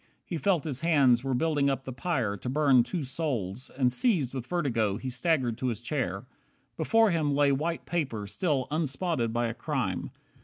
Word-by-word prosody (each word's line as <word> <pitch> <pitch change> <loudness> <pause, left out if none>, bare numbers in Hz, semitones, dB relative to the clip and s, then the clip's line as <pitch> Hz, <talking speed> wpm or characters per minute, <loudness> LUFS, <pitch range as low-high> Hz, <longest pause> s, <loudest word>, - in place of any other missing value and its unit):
He 170 - -4
felt 185 -5 +2
his 140 -3 -3
hands 140 -7 +4
were 135 -2 0
building 145 0 +2
up 135 -1 -1
the 130 - -6
pyre 125 - -1
To 105 +5 -6
burn 135 -2 +4
two 160 +7 -3
souls, 130 - -3
and 125 -2 +2
seized 155 - +2
with 130 -2 -5
vertigo 115 - 0
He 130 +3 -5
staggered 125 -4 0
to 130 - -1
his 115 -4 -1
chair. - - -3 0.5
Before 225 -2 +3
him 150 -4 +1
lay 145 0 +4
White 160 +5 -1
paper 135 -11 -2
still 135 - -1
unspotted 150 -4 -1
by 120 +1 0
a 115 - -2
crime. 115 - -2
135 Hz, 185 wpm, -28 LUFS, 120-160 Hz, 0.5 s, hands